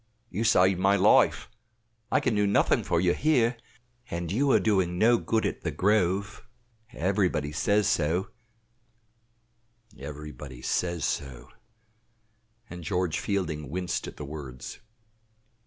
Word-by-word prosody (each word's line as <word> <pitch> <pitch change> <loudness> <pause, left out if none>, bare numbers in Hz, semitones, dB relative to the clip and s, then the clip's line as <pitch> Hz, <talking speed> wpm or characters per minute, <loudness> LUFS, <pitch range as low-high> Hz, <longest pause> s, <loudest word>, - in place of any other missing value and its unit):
"You 105 +5 -2
saved 95 -4 +4
my 95 +2 +3
life 100 +1 +4 0.6
I - - +4
can 120 - 0
do 105 -1 +2
nothing 100 - +2
for 85 - 0
you 90 0 +2
here 125 -6 +2 0.5
and 85 -4 -4
you 135 +8 +1
are - - +5
doing 95 -5 +1
no 115 +4 +4
good 110 -1 0
at - - -3
'The - - -2
Grove' 100 0 0 0.5
everybody 90 -5 0
says 100 +6 +1
so 85 +5 0 1.7
("everybody 70 -2 -9
says 85 0 -1
so!" 65 -4 -4 1.2
and 90 -6 -9
George 90 -2 -1
Fielding 80 -8 -3
winced 90 +3 -3
at - - -10
the 75 - -6
words). 70 -4 -8
90 Hz, 125 wpm, -27 LUFS, 75-105 Hz, 1.7 s, are